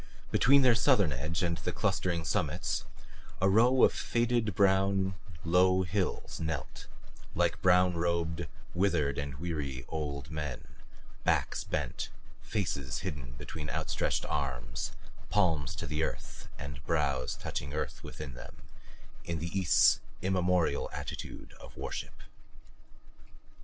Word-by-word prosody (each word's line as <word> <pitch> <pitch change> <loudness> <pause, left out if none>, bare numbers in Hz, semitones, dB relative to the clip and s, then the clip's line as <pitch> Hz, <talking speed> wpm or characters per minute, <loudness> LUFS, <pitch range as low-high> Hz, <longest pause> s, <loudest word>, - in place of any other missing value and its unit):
Between 140 +2 +6
their 125 -2 +7
southern 110 - +4
edge 75 +6 -2
and 85 -1 +1
the - - -2
clustering 85 -3 0
summits - - 0 0.5
a 95 - +4
row 120 +6 +5
of - - +6
faded 115 -4 +1
brown, 95 0 +3 0.3
low 90 +2 +4
hills 95 +1 -2
knelt 80 -2 -4 0.5
like - - +1
brown 90 0 +5
robed, 85 -1 0 0.3
withered 85 -7 +1
and 70 -2 -4
weary 70 -5 -3
old 75 -3 -4
men, 75 -4 -4 0.6
backs - - +1
bent, - - -3 0.3
faces 75 - -2
hidden 70 -9 -5
between 75 +5 -6
outstretched - - -1
arms, 60 -2 -3 0.4
palms 80 -9 +2
to - - -4
the 75 0 -2
earth - - -4
and 70 -1 -7
brows 70 -5 +1
touching 70 - -4
earth 75 - -3
within 75 -4 -7
them 60 - -10 0.7
in 85 -1 -3
the 85 +4 -4
East's 95 -4 +5 0.2
immemorial 90 -5 +2
attitude - - -6
of - - -12
worship. - - -6
85 Hz, 120 wpm, -31 LUFS, 70-95 Hz, 0.7 s, their